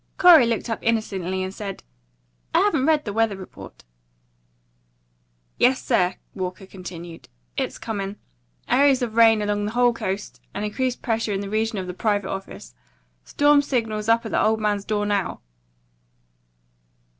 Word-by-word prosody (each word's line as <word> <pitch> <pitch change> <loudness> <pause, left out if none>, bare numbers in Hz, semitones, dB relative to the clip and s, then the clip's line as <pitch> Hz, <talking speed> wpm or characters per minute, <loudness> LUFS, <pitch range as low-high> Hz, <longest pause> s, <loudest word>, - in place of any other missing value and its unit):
Corey 330 -9 +8
looked 230 +1 -1
up 225 - -2
innocently, 190 -5 -1
and 190 0 -5
said, 200 -2 -7 0.7
"I - - +6
haven't 315 -9 +2
read 310 -2 +3
the 205 - -4
weather 225 -2 +1
report." 190 - -12 1.8
"Yes, 260 +1 +4
sir," 185 -7 +2 0.2
Walker 185 +1 -5
continued, 175 -3 -10 0.3
"it's - - -2
coming. 200 -3 -4 0.5
Areas 275 -1 +4
of 230 -3 -3
rain 225 -2 +5
along 205 0 -1
the 210 - -4
whole 245 0 +3
coast, 195 -2 -5
and 205 +2 -2
increased 250 +4 -2
pressure 225 -2 -1
in 195 - -2
the 200 0 -6
region 220 0 0
of 190 - -3
the 180 - -5
private 205 0 -1
office. 195 - -8 0.5
Storm 290 0 +4
signals 225 -6 -2
up 230 +1 +3
at 220 - -5
the - - +2
old 220 0 +2
man's 205 -2 -1
door 210 -1 -1
now." 205 -2 -1
215 Hz, 155 wpm, -23 LUFS, 195-235 Hz, 1.8 s, Corey